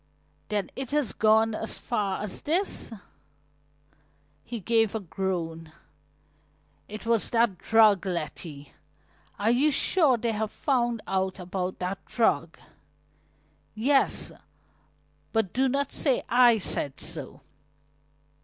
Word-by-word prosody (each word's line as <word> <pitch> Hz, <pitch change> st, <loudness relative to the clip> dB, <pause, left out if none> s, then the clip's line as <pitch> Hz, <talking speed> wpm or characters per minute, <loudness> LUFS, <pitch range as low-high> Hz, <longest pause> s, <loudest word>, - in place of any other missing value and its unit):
"Then 210 Hz, -2 st, -2 dB
it 265 Hz, -1 st, -5 dB
has 290 Hz, -7 st, 0 dB
gone 220 Hz, +1 st, +3 dB
as 220 Hz, +1 st, -4 dB
far 205 Hz, -5 st, -2 dB
as 210 Hz, -, -3 dB
this?" 345 Hz, 0 st, -1 dB, 1.5 s
He 235 Hz, -1 st, -6 dB
gave 225 Hz, +1 st, +2 dB
a -, -, 0 dB
groan. 165 Hz, -4 st, -4 dB, 1.2 s
"It 215 Hz, +2 st, -8 dB
was 230 Hz, -2 st, +1 dB
that 230 Hz, -6 st, +1 dB
drug 215 Hz, -4 st, +4 dB
Letty, 155 Hz, -4 st, -5 dB, 0.6 s
are 215 Hz, +3 st, +2 dB
you 270 Hz, +6 st, +3 dB
sure 295 Hz, -2 st, +3 dB
they 230 Hz, 0 st, -1 dB
have 220 Hz, 0 st, -2 dB
found 240 Hz, -4 st, 0 dB
out 190 Hz, -1 st, -1 dB
about 180 Hz, 0 st, -4 dB
that 185 Hz, +2 st, -4 dB
drug?" 230 Hz, -2 st, 0 dB, 1.2 s
"Yes, 270 Hz, +5 st, +1 dB, 1.0 s
but 220 Hz, -5 st, 0 dB
do 265 Hz, +1 st, +2 dB
not 280 Hz, +1 st, -1 dB
say 270 Hz, -5 st, +2 dB
I 240 Hz, -1 st, +6 dB
said 145 Hz, -8 st, 0 dB
so." -, -, -6 dB
220 Hz, 115 wpm, -27 LUFS, 190-240 Hz, 1.5 s, I